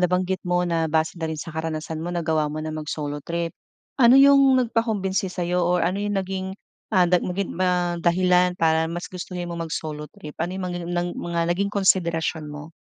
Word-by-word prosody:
nabanggit 180 Hz, +1 st, +1 dB
mo 180 Hz, 0 st, +2 dB
na 165 Hz, -2 st, 0 dB
base 160 Hz, 0 st, +1 dB
na 160 Hz, -, -1 dB
rin 160 Hz, -, -3 dB
sa 165 Hz, -, -6 dB
karanasan 160 Hz, 0 st, -4 dB
mo 170 Hz, -, -4 dB
nagawa 160 Hz, -3 st, 0 dB
mo 155 Hz, -, -5 dB
na 155 Hz, -, -4 dB
mag-solo 150 Hz, -1 st, -4 dB
trip. 170 Hz, +1 st, -3 dB, 0.5 s
Ano 240 Hz, +1 st, +8 dB
yung 275 Hz, -1 st, +7 dB
nagpakumbinsi 220 Hz, -6 st, 0 dB
sa'yo 180 Hz, 0 st, -1 dB
or 175 Hz, 0 st, +2 dB
ano 185 Hz, +4 st, 0 dB
yung 205 Hz, 0 st, -1 dB
naging, 190 Hz, 0 st, -3 dB, 0.4 s
ah, 185 Hz, -4 st, +4 dB
nag 180 Hz, 0 st, +3 dB
maging 185 Hz, +1 st, -2 dB
ma 180 Hz, -1 st, +1 dB
dahilan 180 Hz, +1 st, +3 dB
para 160 Hz, -1 st, +2 dB
mas 175 Hz, +1 st, -4 dB
gustuhin 180 Hz, 0 st, -5 dB
mo 170 Hz, -, -5 dB
mag-solo 155 Hz, -2 st, -4 dB
trip? 150 Hz, -, -10 dB
Ano 170 Hz, +2 st, -1 dB
yung 190 Hz, -, -4 dB
mga 175 Hz, -1 st, -3 dB
ng 175 Hz, 0 st, -1 dB
mga 170 Hz, -1 st, -2 dB
naging 200 Hz, +3 st, 0 dB
konsiderasyon 170 Hz, -5 st, +1 dB
mo? 150 Hz, +2 st, -9 dB
175 Hz, 190 wpm, -24 LUFS, 160-185 Hz, 0.5 s, Ano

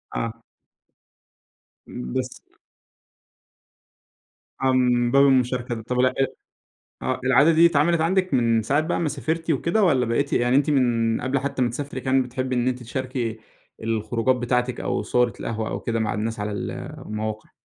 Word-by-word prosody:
آه. 115 Hz, 0 st, -4 dB, 1.5 s
بس 60 Hz, 0 st, -4 dB, 2.3 s
آه، 135 Hz, 0 st, +3 dB
من 125 Hz, -2 st, +2 dB
باب 140 Hz, +1 st, +6 dB
المشاركة 125 Hz, -3 st, +1 dB
طب، 125 Hz, +3 st, -3 dB
ال 130 Hz, 0 st, +3 dB, 0.9 s
آه 130 Hz, 0 st, -1 dB
العادة 140 Hz, +5 st, +5 dB
دي 165 Hz, +1 st, +6 dB
اتعملت 170 Hz, +1 st, +2 dB
عندِك 185 Hz, 0 st, +1 dB
من 115 Hz, -3 st, +3 dB
ساعة 140 Hz, +7 st, +1 dB
بقى 160 Hz, +3 st, -1 dB
ما 165 Hz, -, 0 dB
سافرتِ 160 Hz, +3 st, -3 dB
وكده 170 Hz, -, +1 dB
والَّا 135 Hz, -10 st, +3 dB
بقيتِ 140 Hz, +5 st, 0 dB
يعني 120 Hz, +2 st, +2 dB
أنتِ 145 Hz, +2 st, +2 dB
من 120 Hz, -5 st, +2 dB
قبل 130 Hz, +2 st, 0 dB
حتى 135 Hz, -1 st, -2 dB
ما 120 Hz, -, +1 dB
تسافري 140 Hz, +2 st, -5 dB
كمان 130 Hz, 0 st, +2 dB
بتحبي 130 Hz, +1 st, -3 dB
إن 125 Hz, +1 st, +1 dB
أنتِ 125 Hz, 0 st, -3 dB
تشاركي 125 Hz, -2 st, -3 dB, 0.4 s
الخروجات 115 Hz, +3 st, 0 dB
بتاعتِك 125 Hz, 0 st, -1 dB
أو -, -, -1 dB
صورة 125 Hz, -1 st, +1 dB
القهوة 110 Hz, -1 st, -3 dB
أو -, -, -4 dB
كده 115 Hz, -1 st, -2 dB
مع 110 Hz, -2 st, -1 dB
الناس 110 Hz, +1 st, -3 dB
على 105 Hz, +1 st, -2 dB
ال 100 Hz, -, -4 dB, 0.4 s
المواقع؟ 110 Hz, 0 st, -5 dB
125 Hz, 155 wpm, -23 LUFS, 115-140 Hz, 2.3 s, باب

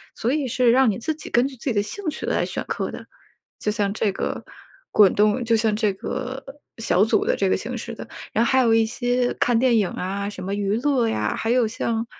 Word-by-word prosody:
所 235 Hz, -, -1 dB
以 290 Hz, -3 st, 0 dB
是 245 Hz, 0 st, +2 dB
让 260 Hz, -1 st, +5 dB
你 195 Hz, -, -5 dB
自 315 Hz, +6 st, -2 dB
己 310 Hz, -, -9 dB
根 240 Hz, +2 st, +3 dB
据 275 Hz, -, -9 dB
自 240 Hz, -, -15 dB
己 255 Hz, -, +1 dB
的 205 Hz, -, +2 dB
兴 380 Hz, -, -6 dB
趣 -, -, -5 dB
来 -, -, +1 dB
选 -, -, -3 dB
课 -, -, -3 dB
的。 -, -, -9 dB, 0.5 s
就 210 Hz, -, 0 dB
像 205 Hz, -2 st, 0 dB
这 210 Hz, -1 st, 0 dB
个 -, -, -4 dB, 0.5 s
滚 205 Hz, -3 st, +6 dB
动 210 Hz, +4 st, +2 dB
就 230 Hz, 0 st, +3 dB
像 220 Hz, -1 st, +2 dB
这 210 Hz, -2 st, +1 dB
个 260 Hz, +7 st, -5 dB, 0.4 s
小 205 Hz, -3 st, +3 dB
组 -, -, +2 dB
的 -, -, +2 dB
这 195 Hz, -, 0 dB
个 -, -, +3 dB
形 240 Hz, +4 st, -5 dB
式 235 Hz, +1 st, -6 dB
的。 -, -, -8 dB, 0.3 s
然 225 Hz, -, +3 dB
后 235 Hz, -, +1 dB
还 260 Hz, -, +4 dB
有 230 Hz, -3 st, +4 dB
一 225 Hz, 0 st, +4 dB
些 245 Hz, +1 st, 0 dB
看 240 Hz, -2 st, +2 dB
电 245 Hz, -3 st, +3 dB
影 200 Hz, -4 st, +2 dB
啊， 200 Hz, +2 st, -3 dB
什 185 Hz, -3 st, -8 dB
么 195 Hz, +2 st, -3 dB
娱 205 Hz, 0 st, 0 dB
乐 270 Hz, -5 st, +2 dB
呀， 105 Hz, -, -1 dB
还 225 Hz, -, -1 dB
有 245 Hz, -1 st, +3 dB
像 225 Hz, +1 st, -2 dB
230 Hz, 265 characters per minute, -23 LUFS, 205-250 Hz, 0.5 s, 滚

